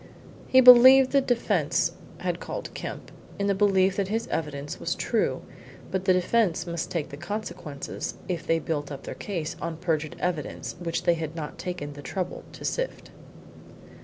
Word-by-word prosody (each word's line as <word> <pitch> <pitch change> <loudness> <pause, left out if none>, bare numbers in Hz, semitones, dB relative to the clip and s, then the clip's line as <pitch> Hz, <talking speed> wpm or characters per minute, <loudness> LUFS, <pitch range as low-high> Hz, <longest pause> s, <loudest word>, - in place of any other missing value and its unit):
He 260 - +6
believed 255 +1 +9
the 275 - +4
defence 245 -3 +1 0.3
had - - -2
called - - -6
Kemp - - -7 0.3
in 200 - -1
the 200 - +3
belief 195 -1 +3
that 200 -2 0
his 225 +3 -1
evidence 145 -2 -4
was - - -2
true, - - 0 0.5
but 190 0 -2
the 185 - +5
defence 180 -2 +1
must 170 -2 -3
take 160 -4 -3
the 140 - -8
consequences 175 -5 -5
if 175 -3 -3
they 165 - +3
built 150 -2 -3
up 140 - -7
their - - -6
case 170 -6 -4
on 165 -1 -3
perjured 160 -3 -1
evidence 175 -4 -3
which 170 -2 -2
they 175 - +4
had 160 -1 -4
not 155 -3 -6
taken 145 -5 -5
the 145 - -10
trouble 180 +5 -4
to - - -9
sift. - - -3
175 Hz, 170 wpm, -26 LUFS, 155-200 Hz, 0.5 s, believed